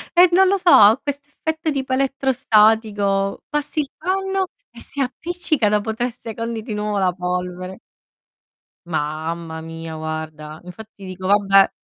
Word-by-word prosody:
e 355 +1 +7
non 380 +2 +5
lo 395 +1 +3
so, 365 -2 +2
ha 215 +4 +7
questo 285 0 -5
effetto 320 +1 -3
tipo 265 -2 -2
elettrostatico. 220 -7 +2
Passi 295 +1 -2
il 280 - -6
panno 385 +2 -1 0.2
e - - -13
si 285 - -9
appiccica 300 -2 -1
dopo 210 +1 0
3 240 +3 -1
secondi 230 -1 -5
di 220 -1 -5
nuovo 210 0 -2
la 185 -2 +2
polvere. 180 +1 -4 1.1
Mamma 160 +1 -3
mia, 165 0 -7
guarda. 155 -1 -6
Infatti 200 +2 -12
dico: 185 0 -6
"Vabbè." 195 -1 +5
210 Hz, 140 wpm, -21 LUFS, 180-275 Hz, 1.1 s, e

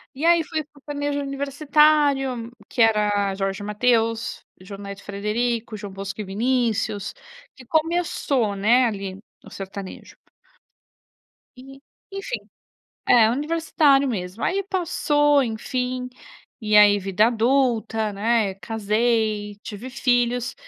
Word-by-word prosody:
E 290 +5 -3
aí, 340 -1 +5
foi 315 0 -3
o - - -12
sertanejo 285 0 -4
universitário, 280 -3 +1 0.2
que 245 - -1
era 210 -3 +2
Jorge 195 0 -3
e - - -6
Mateus, 225 +1 0 0.2
João 195 +1 -10
Neto 200 0 -8
e - - -19
Frederico, 220 +3 -2
João 205 -1 -8
Bosco 195 +2 -6
e - - -4
Vinícius, 220 -1 -1 0.4
que 260 - -14
começou, 310 - 0
né, 235 +6 +4
ali 195 -4 -3 0.3
no - - -14
sertanejo. 195 0 -8 1.4
E, 270 +2 -13 0.3
enfim. 390 +5 -4 0.7
É, 230 -3 +6
universitário 290 0 +2
mesmo. 190 -3 -4
Aí 395 +2 0
passou, 295 -6 +2
enfim, 250 +2 -3 0.5
e 215 -1 +1
aí 205 -1 +7
vida 195 +3 +2
adulta, 230 -3 +1
né, 215 0 +1
casei, 215 +1 -1
tive 220 +4 -7
filhos. 245 -1 0
235 Hz, 120 wpm, -23 LUFS, 210-275 Hz, 1.4 s, aí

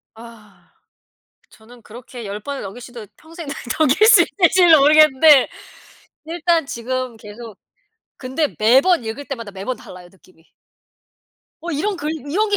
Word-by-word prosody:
아. 225 -3 -17 0.8
저는 235 +2 -19
그렇게 240 +1 -12
10 205 +1 -6
번을 280 +4 -7
넘길 200 +6 -9
수도 240 -3 -11
평생 330 0 -12 0.3
넘길 315 +8 +3
수 - - +7
있을지도 350 -4 +3
모르겠는데 300 -1 +5 0.8
일단 330 -2 -1
지금 255 -1 -5
계속 220 0 -12 0.6
근데 275 +4 -3
매번 260 +7 +3
읽을 225 +6 -6
때마다 230 -7 -8
매번 200 +6 -6
달라요 180 -1 -14
느낌이. 180 -3 -26 1.1
어 345 +1 -6
이런 370 +7 -2
글 300 -1 -4 0.2
"이런 425 +6 0
게 410 - +1
260 Hz, 270 characters per minute, -19 LUFS, 225-315 Hz, 1.1 s, 수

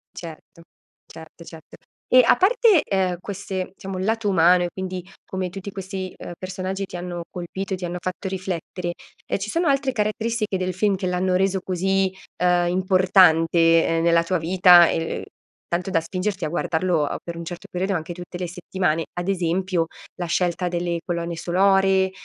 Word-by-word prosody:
Certo. 165 0 -10 0.4
Certo, 160 +1 -13
certo. 160 -1 -13 0.3
E 255 - +6
a - - +6
parte, 435 -3 +4
ehm, 185 -2 0
queste, 190 -1 -5
diciamo, 190 -1 -6
il 185 - -2
lato 225 -1 0
umano 180 -1 +5
e 175 - -1
quindi 185 -1 -5 0.2
come 185 -1 -3
tutti 195 +2 -7
questi, 190 -1 -6
uhm, 175 - -8
personaggi 190 +1 -4
ti 185 - -10
hanno 175 -1 -5
colpito 190 +2 -5
e - - -1
ti 180 - -5
hanno 175 +1 -4
fatto 185 +2 -4
riflettere, 180 -2 -4 0.3
ehm, - - 0
ci 205 +2 -4
sono 335 +5 0
altre 275 -1 +2
caratteristiche 215 -2 -1
del 185 0 -2
film 200 +2 +1
che 185 -1 -3
l'hanno 180 0 0
reso 190 0 +1
così, 190 +1 0 0.3
uhm, 175 -1 +3
importante 170 -3 +4
nella 170 0 +4
tua 185 +1 0
vita, 175 +1 +6
ehm, 165 0 -2 0.4
tanto 175 +2 -2
da 165 - +2
spingerti 185 +2 -3
a - - -2
guardarlo, 170 0 0
uhm, - - -3
per 170 -1 -6
un 170 - -5
certo 175 +1 -8
periodo 190 +2 -1
anche 165 +1 -4
tutte 175 0 -8
le 180 -1 -3
settimane? 175 -2 -2
Ad 175 +1 -4
esempio 180 -2 0 0.3
la 180 - -3
scelta 175 +1 0
delle 175 -1 -2
colonne 170 -1 -3
sonore, 190 +2 +3
185 Hz, 175 wpm, -23 LUFS, 175-195 Hz, 0.4 s, E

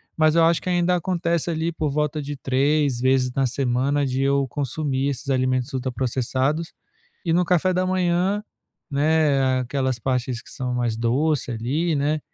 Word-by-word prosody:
Mas 155 0 +3
eu 165 - +5
acho 165 0 +2
que - - -4
ainda 175 0 +2
acontece 170 -2 -1
ali 165 +1 -1
por 155 -2 -1
volta 150 +1 -1
de 145 +1 -5
3 140 0 +1
vezes 130 -1 +2
na 135 +1 +1
semana 135 +3 0
de 130 0 -1
eu 140 0 +2
consumir 140 0 -2
esses 140 +1 -5
alimentos 130 -1 0
ultraprocessados. 130 +4 -1 0.5
E 165 - +1
no 180 +2 +3
café 180 +1 +2
da 185 +1 0
manhã, 185 +2 +1 0.5
né, 140 -3 +2
aquelas 130 0 -1
partes 125 -1 -2
que - - -15
são 125 -2 -3
mais 120 -2 -1
doce 130 +5 0
ali, 140 +9 -1
né, 150 +2 0
140 Hz, 165 wpm, -23 LUFS, 130-160 Hz, 0.5 s, eu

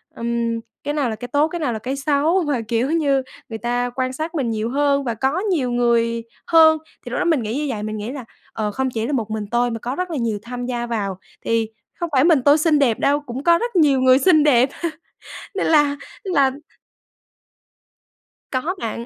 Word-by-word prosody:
ừm, 235 0 -1 0.2
cái 290 - -2
nào 275 -5 0
là 220 - -3
cái 245 +3 -7
tốt, 290 +5 +2
cái 345 +1 -4
nào 265 -7 -1
là 220 - -4
cái 260 +5 -3
xấu. 300 +6 +1
Mà, 275 -5 0
kiểu 240 +5 0
như, 280 -5 +2 0.3
người 225 - -5
ta 245 +2 -1
quan 255 0 -1
sát 315 +5 -5
mình 270 -7 0
nhiều 220 0 -2
hơn 280 +1 +1
và 235 - -2
có 270 - 0
nhiều 345 - 0
người 235 -1 +1 0.2
hơn. 320 -1 +6 0.3
Thì - - -6
lúc - - -1
đó - - 0
mình 320 -8 +2
nghĩ 220 +4 -3
như 300 - -1
vậy, 215 -5 -3
mình 215 0 -4
nghĩ 210 +3 -5
là, 265 -3 -7 0.3
ờ, 215 -2 -2
không 265 +5 -1
chỉ 225 -2 -3
là 295 - -2
một 220 -5 -2
mình 215 -1 -3
tôi 240 0 +1
mà 230 - -4
có 250 +4 -4
rất 365 -1 -3
là 310 - -2
nhiều 225 -4 -1
tham 245 +1 -5
gia 240 -1 -2
vào 200 -5 -3 0.3
thì 225 -1 +1 0.3
không 345 -1 -2
phải 260 0 +4
mình 325 -5 +4
tôi 285 +1 +6
xinh 310 -1 +3
đẹp 245 -6 +2
đâu, 285 +1 +2
cũng 265 -1 -7
có 340 +1 +5
rất 475 +3 -4
nhiều 280 -5 +4
người 260 0 +6
xinh 310 -2 +5
đẹp. 260 -3 +4 0.9
Nên 390 - -1
là 295 -3 +4 0.3
là 285 -9 +3 2.0
Có 290 +8 -1
bạn. 230 +1 -4
260 Hz, 225 wpm, -21 LUFS, 235-295 Hz, 2.0 s, hơn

